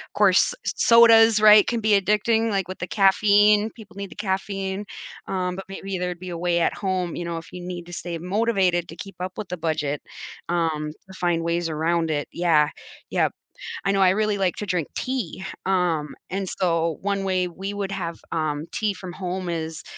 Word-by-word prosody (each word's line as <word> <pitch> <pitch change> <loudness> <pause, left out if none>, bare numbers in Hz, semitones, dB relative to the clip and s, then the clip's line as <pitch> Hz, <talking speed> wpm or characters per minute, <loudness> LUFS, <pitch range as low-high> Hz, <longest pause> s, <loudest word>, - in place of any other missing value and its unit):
'course, - - +4
sodas, 225 -2 +6
right, 210 -1 +8
can 235 -1 -1
be 210 -2 +4
addicting, 215 +3 +1
like, 195 -3 -1
with 185 - -7
the 175 - -4
caffeine- 205 +2 +4
people 205 -4 -14
need 200 -1 -5
the - - -11
caffeine- 195 0 -3 0.4
um, 180 -1 -2
but 195 - -7
maybe 195 0 -5
there'd 180 -1 -3
be 185 0 -7
a 170 - -5
way 170 0 +1
at - - +2
home, 185 -3 -2
you 175 - -4
know, 170 -1 -3
if 165 - -9
you 180 - -8
need 175 -1 -6
to - - -10
stay 175 0 -5
motivated 185 -1 +1
to 165 - -10
keep 195 +2 -9
up 185 0 -5
with 215 - -6
the 180 - -4
budget, 155 -3 -2 0.5
um, 160 -3 -1 0.2
to 190 - -12
find 170 -2 +1
ways 170 0 0
around 165 +1 0
it. 145 -1 -1
Yeah. 160 -4 +3 0.4
Yep. - - +1 0.5
I 195 - +3
know 195 0 +2
I 185 -1 +6
really 210 +1 +1
like 190 -3 +1
to 210 - -4
drink 180 -6 -1
tea. 240 -8 -3 0.2
Um, 175 -6 0
and 195 0 -3
so 165 -3 0
one 200 0 -1
way 185 -1 0
we 190 +3 -6
would 200 -1 -3
have, 170 -4 -4
um, 155 -2 -1
tea 215 -2 -1
from 185 -2 -8
home 185 -1 -4
is- 160 -1 -4
185 Hz, 200 wpm, -24 LUFS, 170-200 Hz, 0.5 s, right